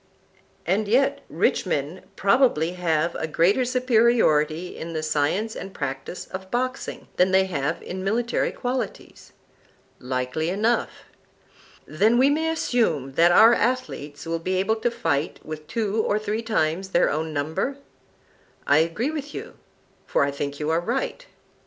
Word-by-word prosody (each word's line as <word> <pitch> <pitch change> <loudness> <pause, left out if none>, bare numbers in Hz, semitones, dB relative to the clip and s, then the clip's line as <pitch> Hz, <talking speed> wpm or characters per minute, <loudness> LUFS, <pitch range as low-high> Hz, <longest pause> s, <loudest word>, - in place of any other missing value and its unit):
And 200 +5 +1
yet 255 +6 +2
rich - - +1
men 155 +2 -2
probably 195 - +3
have 170 -2 0
a 160 - -3
greater 180 +10 +3
superiority 225 - +2
in 165 +1 -6
the 155 -1 -3
science 155 +9 0
and 195 - -8
practise 135 +6 -5
of 190 0 -8
boxing 255 +3 -3
than 180 +1 +4
they 190 0 +4
have 155 -3 -2
in 185 +1 -5
military 235 +5 0
qualities. 250 +1 -5 0.7
Likely 130 +5 -2
enough. 220 +6 +1 1.0
Then 210 +9 +2
we 265 +3 +5
may 320 +2 +1
assume 225 - 0
that 170 +6 +4
our 220 +6 +7
athletes 230 - -2
will 165 0 -2
be 185 +3 -2
able 195 +4 +1
to 230 +2 0
fight 165 -11 -1
with 155 -1 -7
two 220 -1 0
or 210 - +1
three 215 +1 -2
times 190 -5 -1
their 175 -2 +3
own 160 +2 -2
number? 160 - -2 0.9
I 145 +2 +5
agree 170 - 0
with 295 -2 -6
you, - - -7 0.5
for - - +2
I 140 - 0
think 140 0 -4
you 150 +1 -1
right. 245 - -2
185 Hz, 145 wpm, -24 LUFS, 155-235 Hz, 1.0 s, our